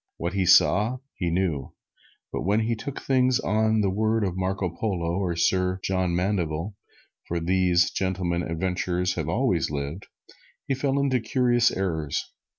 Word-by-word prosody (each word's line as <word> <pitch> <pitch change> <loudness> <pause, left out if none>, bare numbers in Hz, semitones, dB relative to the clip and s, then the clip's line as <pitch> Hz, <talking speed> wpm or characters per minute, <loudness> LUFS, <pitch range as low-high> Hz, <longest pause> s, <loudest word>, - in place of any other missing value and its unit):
What 85 +2 -3
he 95 -2 0
saw, 105 +6 +5 0.2
he 90 - -2
knew, 85 -6 -1 0.6
but - - -2
when 100 +5 +2
he 115 +1 0
took 135 +5 -6
things 130 -1 +2
on 110 0 +1
the 100 -2 +1
word 110 +2 +1
of 95 -3 -1
Marco 95 0 -1
Polo 90 -2 -1
and 85 - -3
Sir 90 +1 +1
John 95 -2 0
Mandeville 90 -1 -1 0.5
(for 85 - -1
these 90 0 +2
gentlemen 90 -2 -1
adventurers 90 +1 -1
have 80 -5 -3
always - - +1
lived), 75 +5 -5 0.6
he - - +1
fell 135 +1 0
into 135 -2 +2
curious 120 +1 +2
errors. 80 -6 -3
95 Hz, 155 wpm, -25 LUFS, 85-110 Hz, 0.6 s, saw